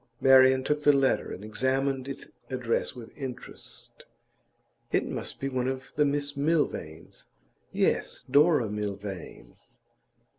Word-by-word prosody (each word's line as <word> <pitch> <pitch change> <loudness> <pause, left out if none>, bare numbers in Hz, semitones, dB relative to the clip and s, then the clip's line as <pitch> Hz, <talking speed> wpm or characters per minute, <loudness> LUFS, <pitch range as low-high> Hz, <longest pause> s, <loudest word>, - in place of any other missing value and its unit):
Marian 130 0 +6
took 150 +2 0
the 145 - +6
letter 135 -2 +2
and 100 - -7
examined 130 +4 0
its 140 - -6 0.2
address 125 -2 -1
with 120 -2 -11
interest. 130 -4 -8 0.9
'It - - +2
must - - -5
be 135 - -2
one 130 -2 -1
of 130 0 -4
the 150 - +3
Miss 145 0 -1
Milvains. 140 - -2 0.4
Yes; - - 0
Dora 145 -2 +4
Milvain. 100 -10 -6
130 Hz, 120 wpm, -28 LUFS, 115-140 Hz, 0.9 s, Marian